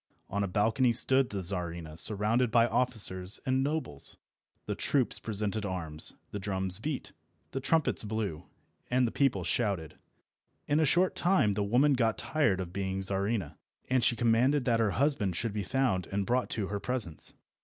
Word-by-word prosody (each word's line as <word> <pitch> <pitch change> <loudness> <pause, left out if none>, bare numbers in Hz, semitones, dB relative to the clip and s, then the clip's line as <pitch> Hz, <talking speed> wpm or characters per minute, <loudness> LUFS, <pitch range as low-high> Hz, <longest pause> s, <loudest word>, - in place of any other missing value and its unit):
On 100 +1 0
a - - -1
balcony 110 +6 +2
stood 130 +2 +5
the 100 -2 -4
Czarina 85 -3 -1
surrounded 110 +7 0
by 115 +1 +4
officers 105 -6 -1
and 130 0 +1
nobles. 145 - -3 0.5
The - - -2
troops 135 -4 0
presented 105 0 -2
arms, 80 -6 -1 0.2
the 105 - -4
drums 95 -1 -1
beat, 145 +3 -4 0.4
the 135 - -3
trumpets 155 +1 +1
blew, 105 -7 -3 0.4
and 125 +1 +3
the 115 - -1
people 130 -10 +1
shouted. 90 -6 -2 0.7
In 145 +1 +2
a 160 - +4
short 180 +5 +2
time 175 - +3
the 105 - -2
woman 125 +8 +3
got 115 -4 +1
tired 130 -12 +1
of 90 -2 -5
being 95 0 -2
Czarina, 95 -4 -2 0.3
and 130 -2 +3
she 120 - +3
commanded 125 +4 +2
that 115 -2 +2
her 110 -2 +2
husband 130 - +1
should 110 +3 -2
be 105 - -2
found 105 -3 0
and 100 0 -2
brought 125 +3 0
to 100 -4 -2
her 100 0 -2
presence. 105 - -4
110 Hz, 170 wpm, -30 LUFS, 95-125 Hz, 0.7 s, stood